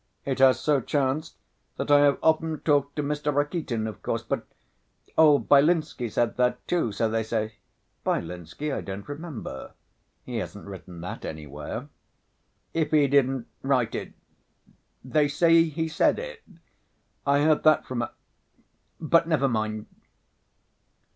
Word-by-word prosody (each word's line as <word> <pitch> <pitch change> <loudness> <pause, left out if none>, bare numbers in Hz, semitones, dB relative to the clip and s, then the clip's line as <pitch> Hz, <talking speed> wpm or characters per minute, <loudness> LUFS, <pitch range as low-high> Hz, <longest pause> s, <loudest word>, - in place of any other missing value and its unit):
It 135 -1 -2
has 130 -1 +6
so 145 -3 +2
chanced 145 +5 -1 0.4
that - - -2
I 145 - +8
have 145 -1 +4
often 160 0 +2
talked 145 -2 +1
to 150 - -1
Mr. 150 +1 -1
Rakitin, 145 -5 -1
of 110 -3 -6
course, - - -2
but... - - -3 0.7
old 150 -3 +5
Byelinsky 145 -4 +3
said 115 +2 0
that, 125 0 0
too, 170 -11 +1
so 110 +3 0
they 110 +1 0
say." 110 -1 -3 0.5
"Byelinsky? 90 - -3
I - - -3
don't 100 +1 -7
remember. 145 - -7 0.5
He 125 -2 -4
hasn't 105 -2 -6
written 90 -3 -9
that 90 - -6
anywhere." 75 -1 -6 0.9
"If 160 -2 0
he 150 -2 +4
didn't 135 -2 +2 0.2
write 130 -4 +1
it, - - -5 0.9
they 145 +3 +2
say 165 +3 +4
he 160 +1 -2
said 155 - +2
it. - - -7 0.9
I 140 +1 +4
heard 155 0 +4
that 155 -1 +4
from 125 -2 -3
a... 120 - -3 0.9
but 165 +1 +3
never 155 -5 +2
mind." 110 -3 -2
140 Hz, 140 wpm, -26 LUFS, 115-155 Hz, 0.9 s, I